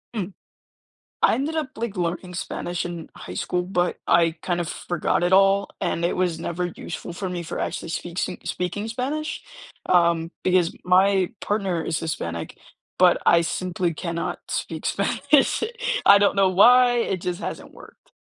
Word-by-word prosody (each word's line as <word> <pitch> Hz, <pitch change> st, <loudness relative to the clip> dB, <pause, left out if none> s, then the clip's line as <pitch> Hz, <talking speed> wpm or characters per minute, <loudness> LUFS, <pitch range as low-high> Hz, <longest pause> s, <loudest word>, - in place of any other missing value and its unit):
Mm. 200 Hz, -3 st, -3 dB, 0.9 s
I -, -, +5 dB
ended 295 Hz, +5 st, -2 dB
up, 310 Hz, -4 st, -1 dB
like, 225 Hz, -2 st, -3 dB
learning 180 Hz, 0 st, -3 dB
Spanish 175 Hz, 0 st, -4 dB
in 170 Hz, -2 st, -6 dB
high 90 Hz, -, -9 dB
school, 180 Hz, -, -1 dB
but 180 Hz, -1 st, -1 dB
I 165 Hz, -1 st, +4 dB
kind 175 Hz, -1 st, -1 dB
of 170 Hz, -, -2 dB
forgot 175 Hz, +1 st, -1 dB
it 175 Hz, -, +1 dB
all, 195 Hz, +1 st, +4 dB
and 175 Hz, -2 st, -1 dB
it 170 Hz, -, +1 dB
was 180 Hz, -3 st, 0 dB
never 175 Hz, +1 st, -2 dB
useful 175 Hz, 0 st, -7 dB
for 185 Hz, +2 st, -4 dB
me 175 Hz, -1 st, -4 dB
for 165 Hz, -, -5 dB
actually -, -, -3 dB
speak 170 Hz, +1 st, -5 dB
sing 185 Hz, -, -2 dB
speaking 180 Hz, +4 st, -3 dB
Spanish, 280 Hz, +7 st, -3 dB, 0.4 s
um, 170 Hz, -2 st, +2 dB
because 180 Hz, -2 st, +2 dB
my 190 Hz, 0 st, +4 dB
partner 195 Hz, -5 st, -1 dB
is 160 Hz, -, -1 dB
Hispanic, 85 Hz, -, -4 dB, 0.4 s
but 180 Hz, -1 st, +5 dB
I 170 Hz, -, +6 dB
simply 175 Hz, 0 st, -2 dB
cannot 170 Hz, +1 st, -4 dB
speak -, -, -4 dB
Spanish. 285 Hz, +6 st, +2 dB, 0.4 s
I 200 Hz, -, +9 dB
don't 200 Hz, 0 st, +3 dB
know 195 Hz, -1 st, +4 dB
why, 245 Hz, +6 st, +6 dB
it 195 Hz, -6 st, -1 dB
just 175 Hz, -1 st, -3 dB
hasn't -, -, -6 dB
worked. -, -, -16 dB
180 Hz, 165 wpm, -24 LUFS, 170-200 Hz, 0.9 s, I